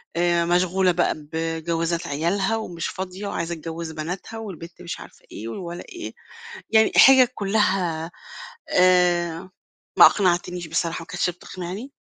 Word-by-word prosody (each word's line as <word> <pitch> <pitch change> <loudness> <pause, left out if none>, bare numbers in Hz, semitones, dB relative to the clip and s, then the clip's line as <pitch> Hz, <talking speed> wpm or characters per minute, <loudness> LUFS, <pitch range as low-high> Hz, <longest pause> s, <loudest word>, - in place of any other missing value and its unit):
آآ 170 0 +2
مشغولة 180 +1 +2
بقى 175 0 +1 0.2
بجوازات 165 +1 -2
عيالها 190 +9 0
ومش 175 -7 -4
فاضية 190 +2 -6
وعايزة 170 -3 -3
تجوّز 165 +1 -6
بناتها 175 +8 -6
والبنت 180 -5 -9
مش 170 - -6
عارفة - - -14
إيه 110 - -7
والولا 170 +8 -6
إيه، 350 -1 -7 0.6
يعني 220 0 +4
حِجج 265 -2 +8
كلّها 190 -5 0 0.6
آآ 180 -1 +3 0.5
ما - - +11
أقنعتنيش 180 -2 +1
بصراحة 165 0 -1
ما 165 - -11
كانتش 175 +2 -1
بتقنعني. 185 +8 -8
175 Hz, 130 wpm, -23 LUFS, 165-190 Hz, 0.6 s, ما